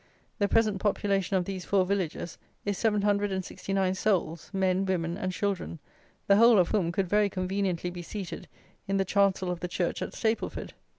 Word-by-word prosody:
The 205 Hz, -, +3 dB
present 215 Hz, -3 st, +2 dB
population 195 Hz, -2 st, +1 dB
of 180 Hz, -, 0 dB
these 190 Hz, -1 st, -5 dB
four 190 Hz, 0 st, +2 dB
villages 185 Hz, -3 st, -2 dB, 0.3 s
is 205 Hz, -1 st, 0 dB
769 200 Hz, -3 st, 0 dB
souls, 185 Hz, -5 st, -1 dB
men, 190 Hz, -1 st, +1 dB
women, 175 Hz, -3 st, -1 dB
and 185 Hz, -1 st, -2 dB
children, 195 Hz, -2 st, -2 dB, 0.5 s
the 200 Hz, -, +5 dB
whole 230 Hz, 0 st, +7 dB
of 180 Hz, -3 st, +4 dB
whom 185 Hz, -6 st, +1 dB
could 190 Hz, +2 st, 0 dB
very 205 Hz, +2 st, +3 dB
conveniently 185 Hz, -2 st, -1 dB
be 175 Hz, 0 st, -7 dB
seated 185 Hz, +1 st, -6 dB, 0.4 s
in 195 Hz, 0 st, +1 dB
the 195 Hz, -, +1 dB
chancel 190 Hz, -1 st, +2 dB
of 175 Hz, -, -4 dB
the 180 Hz, -, -3 dB
church 175 Hz, 0 st, -2 dB
at -, -, -4 dB
Stapleford. 225 Hz, 0 st, -2 dB
195 Hz, 170 wpm, -28 LUFS, 180-200 Hz, 0.5 s, whole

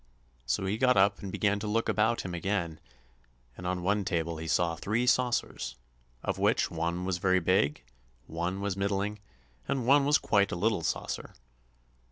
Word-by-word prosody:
So 65 Hz, +10 st, 0 dB
he 100 Hz, +3 st, -1 dB
got 125 Hz, -2 st, +4 dB
up 100 Hz, +1 st, +4 dB
and 100 Hz, -, -6 dB
began 105 Hz, +1 st, +1 dB
to 105 Hz, -, -4 dB
look 115 Hz, +2 st, 0 dB
about 110 Hz, +2 st, +2 dB
him 90 Hz, -, -6 dB
again, 85 Hz, -3 st, -2 dB, 0.8 s
and 90 Hz, -, -6 dB
on 90 Hz, -1 st, -2 dB
one 100 Hz, +2 st, +1 dB
table 85 Hz, -3 st, -1 dB
he 80 Hz, +1 st, -6 dB
saw 85 Hz, +1 st, +1 dB
three 110 Hz, +8 st, -1 dB
saucers, 120 Hz, -, 0 dB, 0.5 s
of -, -, -2 dB
which -, -, +2 dB
one 85 Hz, +2 st, -2 dB
was 90 Hz, -2 st, -1 dB
very 95 Hz, 0 st, +3 dB
big, 80 Hz, -6 st, +1 dB, 0.4 s
one 90 Hz, +4 st, -3 dB
was 100 Hz, -2 st, -1 dB
middling, 100 Hz, +1 st, -1 dB, 0.5 s
and 130 Hz, -3 st, -1 dB
one 140 Hz, +2 st, +5 dB
was 145 Hz, +2 st, +5 dB
quite 100 Hz, -2 st, +2 dB
a -, -, -1 dB
little 105 Hz, +1 st, +1 dB
saucer. -, -, -3 dB
95 Hz, 175 wpm, -29 LUFS, 85-105 Hz, 0.8 s, one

